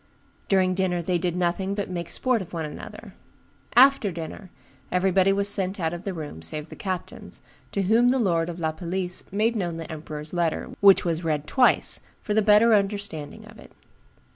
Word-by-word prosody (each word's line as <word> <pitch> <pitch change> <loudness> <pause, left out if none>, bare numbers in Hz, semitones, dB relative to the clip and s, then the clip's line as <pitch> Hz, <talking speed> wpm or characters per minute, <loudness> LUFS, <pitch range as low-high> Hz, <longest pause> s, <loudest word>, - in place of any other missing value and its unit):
During 185 -2 +3
dinner 180 -1 0
they 175 +1 0
did 175 -1 -2
nothing 180 +2 -1
but 205 -1 -3
make 175 -2 -5
sport 255 -4 0
one 165 -2 -3
of 150 - -6
another. - - -10 0.6
After 255 -5 +6
dinner, 170 +3 -8 0.4
everybody 190 +1 +3
was 200 +1 +1
sent 195 -1 +1
out 165 -1 -1
of 175 +4 -7
the 195 - -2
room, 150 - -7
save 150 - -5
the - - -10
captains, 185 -2 -6 0.3
to 200 - -1
whom 225 +5 +4
the 260 - +2
lord 170 -8 +1
of 175 0 -6
La 160 -1 0
Palisse 180 +2 -4
made 220 +4 +1
known 175 -6 -2
the 165 -1 -7
emperor's 150 0 -7
letter, 170 -2 -1
which 195 -2 +6
was 170 0 -1
read 150 -2 -1
twice, 255 - +3 0.2
for 210 - -2
the 220 - +3
better 215 +2 +5
understanding 200 -7 -2
of - - -15
it. - - -15
185 Hz, 190 wpm, -25 LUFS, 165-200 Hz, 0.6 s, After